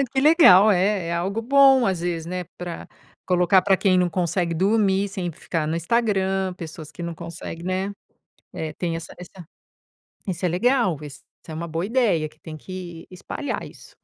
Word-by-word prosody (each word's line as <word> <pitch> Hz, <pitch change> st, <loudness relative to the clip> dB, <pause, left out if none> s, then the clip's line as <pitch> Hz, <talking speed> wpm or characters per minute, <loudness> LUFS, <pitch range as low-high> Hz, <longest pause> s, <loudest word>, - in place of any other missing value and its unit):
É, -, -, +3 dB
que 265 Hz, +1 st, -2 dB
legal, 265 Hz, -, +7 dB
é 190 Hz, -2 st, +1 dB
é -, -, -2 dB
algo 195 Hz, +6 st, -2 dB
bom 270 Hz, 0 st, +5 dB
às 185 Hz, -3 st, -1 dB
vezes, 170 Hz, -2 st, -3 dB
né, 180 Hz, +1 st, -4 dB
pra 175 Hz, -1 st, -7 dB, 0.4 s
colocar 180 Hz, +1 st, +4 dB
pra 195 Hz, +1 st, +3 dB
quem 185 Hz, -1 st, +2 dB
não 180 Hz, -1 st, +2 dB
consegue 175 Hz, 0 st, -1 dB
dormir, 195 Hz, +2 st, +2 dB
sem 190 Hz, -3 st, -4 dB
ficar 165 Hz, -1 st, -3 dB
no 160 Hz, +2 st, -1 dB
Instagram, 190 Hz, -1 st, 0 dB
pessoas 160 Hz, -3 st, -9 dB
que 175 Hz, -, -9 dB
não 170 Hz, -1 st, -4 dB
consegue, 170 Hz, 0 st, -8 dB
né, 185 Hz, +2 st, -2 dB, 0.6 s
é, 155 Hz, -1 st, -5 dB
tem 170 Hz, -2 st, -3 dB
essa 165 Hz, -, -8 dB
essa 180 Hz, -1 st, -12 dB, 0.8 s
isso 180 Hz, -1 st, -2 dB
é 180 Hz, -, +2 dB
legal, 230 Hz, -, +2 dB
isso 145 Hz, -2 st, -10 dB, 0.3 s
é 160 Hz, -, -7 dB
uma 170 Hz, +2 st, -5 dB
boa 165 Hz, +3 st, -3 dB
ideia 210 Hz, -10 st, +1 dB
que -, -, -26 dB
tem 160 Hz, -2 st, -9 dB
que 175 Hz, 0 st, -9 dB
espalhar 185 Hz, +10 st, -5 dB
isso. -, -, -16 dB
180 Hz, 185 wpm, -23 LUFS, 170-200 Hz, 0.8 s, legal